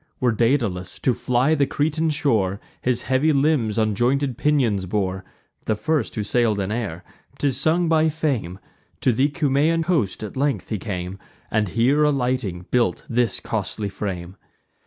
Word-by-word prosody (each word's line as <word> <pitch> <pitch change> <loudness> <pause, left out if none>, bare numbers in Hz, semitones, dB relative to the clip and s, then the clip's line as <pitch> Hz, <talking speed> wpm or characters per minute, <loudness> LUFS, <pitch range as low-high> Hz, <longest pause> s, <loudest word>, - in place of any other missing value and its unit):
When 125 -2 +1
Daedalus, 115 -7 0
to 130 - +3
fly 125 +5 +1
the 140 -3 +2
Cretan 160 +2 0
shore, 110 -10 +1 0.2
His 125 -1 0
heavy 135 +4 +2
limbs 140 -7 +2
on 110 -1 +2
jointed 130 +4 +1
pinions 120 -10 +1
bore, 95 -1 -1 0.4
(The 110 - +2
first 130 +4 -1
who 105 - -1
sail'd 110 0 +1
in 100 +1 -2
air,) 100 -7 -3 0.3
'tis 135 -3 0
sung 165 +4 +2
by 160 -1 +3
Fame, 140 - -2 0.4
To 130 - +3
the 130 +5 +2
Cumaean 150 +2 +1
coast 155 - 0
at 105 - -7
length 135 -6 -1
he 110 - -2
came, 90 -2 -5 0.3
And 110 -1 +1
here 130 +9 +3
alighting, 125 -10 0
built 125 -1 +1
this 120 0 +2
costly 105 -2 -3
frame. 95 -2 -5
120 Hz, 155 wpm, -23 LUFS, 105-145 Hz, 0.4 s, to